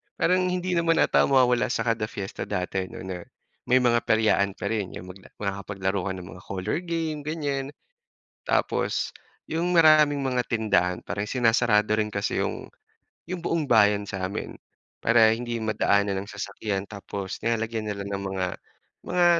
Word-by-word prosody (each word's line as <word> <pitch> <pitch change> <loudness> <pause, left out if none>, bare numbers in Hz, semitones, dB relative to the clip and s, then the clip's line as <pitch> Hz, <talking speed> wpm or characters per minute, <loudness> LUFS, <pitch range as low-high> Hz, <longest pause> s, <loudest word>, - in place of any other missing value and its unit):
parang 185 +1 +2
hindi 180 0 -1
naman 170 -1 +3
ata - - +3
mawawala 125 -3 +4
sa 115 - -1
kada 115 -2 0
fiesta 100 -2 -6
dati 95 -1 -2
'no, - - -9
na 90 -2 -6 0.4
may 130 +1 +4
mga 120 -1 +4
peryaan 105 -3 +3
pa - - -3
rin 105 -4 -2
'yung 90 0 -8
mag 100 - -15 0.2
makakapaglaro 100 -1 -3
ka - - -1
ng 90 -1 -8
mga 90 - -11
coller 95 - -2
game 160 -4 -3
ganiyan. 145 -3 -2 0.7
Tapos - - 0 0.3
'yung 170 +2 -1
maraming 155 -4 +6
mga 130 -2 0
tindahan 100 -6 +1
parin 100 +1 -3
sinasarado 115 -3 +3
rin 110 0 0
kasi 100 0 -1
'yung - - -3 0.7
'yung 185 - -2
buong 165 -5 -1
bayan 105 -2 +5
sa 95 -2 -3
amin 100 - -5 0.5
para 115 -1 +5
hindi 120 0 -4
madaanan 100 -2 +1
ng 100 - -11
sasakyan, 100 -1 -4
tapos 100 -2 -6
nilalagyan 115 -1 -1
nila 100 0 -5
ng 100 -1 -4
mga 95 -1 -2 0.6
mga 180 -1 +2
110 Hz, 160 wpm, -26 LUFS, 100-135 Hz, 0.7 s, maraming